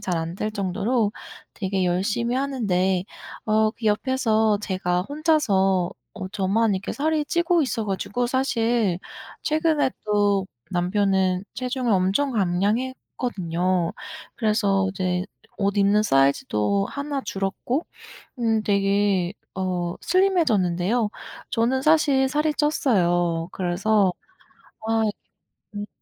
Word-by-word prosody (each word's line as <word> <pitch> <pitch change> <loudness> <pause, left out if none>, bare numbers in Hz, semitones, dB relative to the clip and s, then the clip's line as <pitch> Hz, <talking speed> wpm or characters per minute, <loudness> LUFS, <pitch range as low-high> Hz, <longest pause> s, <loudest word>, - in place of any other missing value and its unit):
잘 185 -4 -2
안 165 +1 -3
될 215 +2 -2
정도로 210 +3 0 0.4
되게 190 -2 -1
열심히 205 +7 0
하는데 190 -9 0 0.4
어 215 0 +3
그 225 +1 -12
옆에서 220 -1 +2
제가 185 -3 -1
혼자서 200 - +1 0.2
어 190 -3 -6
저만 205 +2 +1
이렇게 190 +1 -4
살이 310 +1 0
찌고 345 +1 +2
있어 230 -5 -2
가지고. 205 +5 -2
사실 235 -6 +1 0.4
최근에 310 -2 +2
또 205 -2 +2 0.2
남편은 190 0 +1
체중을 255 -2 -1
엄청 195 +9 +2
감량했거든요. 185 -3 -1 0.4
그래서 205 -4 +1
이제 185 -1 -1 0.3
옷 200 -1 0
입는 200 +1 +4
사이즈도 135 - +2
1 280 0 -3
줄었고 205 - -2 0.5
음 225 -2 +2
되게 200 -2 +1 0.2
어 180 -2 -2
슬림해 370 0 +3
졌는데요. 205 - +1 0.4
저는 250 +2 +1
사실 285 -3 +4
살이 300 +3 +1
쪘어요. 175 - +1
그래서 190 +2 +1 0.7
아 225 0 +2 0.7
음 205 0 -4
205 Hz, 230 characters per minute, -24 LUFS, 185-250 Hz, 0.7 s, 입는